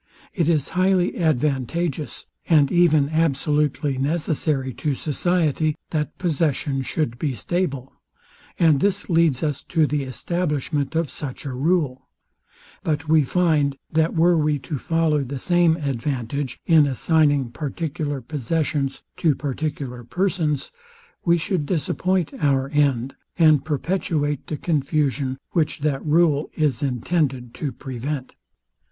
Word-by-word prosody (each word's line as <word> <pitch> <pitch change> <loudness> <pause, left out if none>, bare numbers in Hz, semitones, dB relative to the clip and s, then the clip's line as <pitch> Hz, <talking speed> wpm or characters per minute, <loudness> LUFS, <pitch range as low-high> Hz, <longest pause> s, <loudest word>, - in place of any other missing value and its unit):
It 170 -3 +1
is 155 -5 +1
highly 185 0 +2
advantageous, 150 0 -1 0.2
and 150 -4 +5
even 155 -5 +4
absolutely 150 -3 +1
necessary 145 -2 0
to 140 +4 -2
society, 155 0 0 0.2
that 150 -2 -2
possession 150 -5 0
should 125 -3 -2
be 140 -5 -1
stable; 140 - -2 0.6
and 160 -5 +4
this 200 +2 0
leads 165 -5 +3
us 150 -3 -1
to 160 -3 +3
the 150 0 -1
establishment 150 0 -2
of 165 -3 0
such 135 -2 -7
a 135 - -4
rule: 135 -2 0 0.7
But 155 0 -1
we 155 -1 +5
find, 150 -3 +1
that 160 +2 +1
were 170 +2 +4
we 150 -1 +1 0.2
to 140 - -1
follow 160 -2 +1
the 135 +2 -5
same 175 +3 +3
advantage, 135 -2 -3
in 160 -4 +5
assigning 145 -2 +2
particular 145 +1 -3
possessions 145 +1 -2
to 155 -4 +2
particular 140 -3 -4
persons, 165 -1 -1 0.5
we 170 0 +4
should 165 -2 -1
disappoint 180 +1 0
our 135 -3 +1
end, 140 -3 +1 0.2
and 155 -5 +5
perpetuate 150 -2 -1
the 150 - -3
confusion, 140 -4 0
which 160 -4 0
that 145 -2 0
rule 155 -1 +2
is 150 -7 +1
intended 130 -2 -1
to 145 - -3
prevent. 130 +1 -5
150 Hz, 125 wpm, -23 LUFS, 135-165 Hz, 0.7 s, and